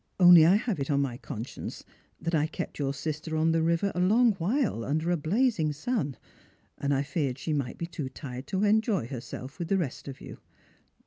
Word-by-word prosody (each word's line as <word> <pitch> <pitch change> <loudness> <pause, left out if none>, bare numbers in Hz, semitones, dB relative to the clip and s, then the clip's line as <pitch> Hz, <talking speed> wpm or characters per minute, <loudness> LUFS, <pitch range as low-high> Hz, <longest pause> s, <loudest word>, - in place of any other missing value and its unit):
" - - -44
Only 175 -3 +9
I 185 - +6
have 215 -5 -1
it 140 - -3
on 140 -1 +2
my 130 -4 -1
conscience 115 -1 -7 0.4
that 165 +1 -3
I 155 -1 +2
kept - - -6
your 140 -1 0
sister 155 +2 -4
on 160 +1 +3
the 165 0 +2
river 170 +4 +1
a - - -3
long 220 +6 +4
while 200 - 0
under 155 +6 0
a - - +3
blazing 175 - +1
sun, 150 - -2 0.6
and 140 - -1
I 140 0 +2
feared 140 -3 -2
she 155 +3 -3
might 140 -4 -2
be 170 - -3
too 155 -5 -5
tired 130 -1 -8
to 195 +1 -1
enjoy 215 - +2
herself 130 +3 -7
with 170 - -3
the 195 - +2
rest 155 -8 -3
of 135 -1 -7
you. - - -10
160 Hz, 210 wpm, -28 LUFS, 140-185 Hz, 0.6 s, Only